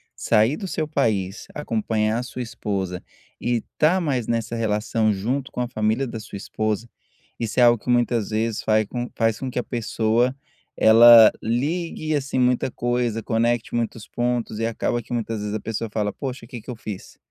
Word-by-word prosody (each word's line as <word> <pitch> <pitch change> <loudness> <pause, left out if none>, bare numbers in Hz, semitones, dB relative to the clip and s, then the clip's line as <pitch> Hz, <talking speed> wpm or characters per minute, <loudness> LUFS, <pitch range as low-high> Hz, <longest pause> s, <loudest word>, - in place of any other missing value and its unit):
sair 115 +5 +2
do 195 - -6
seu 155 -3 -2
país, 105 -9 -1
acompanhar 110 -4 -1
a 125 - -3
sua 125 0 -6
esposa 100 -6 -4 0.4
e 120 0 +1 0.2
estar 165 +5 +3
mais 135 -9 -1
nessa 115 0 -1
relação 110 0 +1
junto 125 +8 -2
com 125 - -3
a 120 - -1
família 110 +3 0
da 115 -2 -6
sua 105 -2 -8
esposa, 110 +3 -2 0.5
isso 115 +1 -2
é - - +7
algo 120 -3 +5
que - - -6
muitas 120 -3 +2
vezes 110 0 -1
fai 110 -1 +2 0.3
faz 115 -1 +1
com 130 - -3
que - - -8
a - - -2
pessoa, 115 +1 0 0.4
ela 115 0 +9
ligue 155 +6 -1
assim 140 -2 -2
muita 125 0 +2
coisa, 120 -2 -1
conecte 115 0 0
muitos 115 -2 -3
pontos 120 -3 -2
e 115 - 0
acaba 115 +1 -1
que 115 +2 -17
muitas 115 -2 -2
vezes 105 0 -4
a 110 - -1
pessoa 115 +1 -4
fala: 105 -1 -1
"Poxa, 130 -3 -6
o - - -17
que 120 -5 -7
que - - -15
eu 125 - -4
fiz", 105 -3 -8
115 Hz, 185 wpm, -23 LUFS, 110-125 Hz, 0.5 s, ela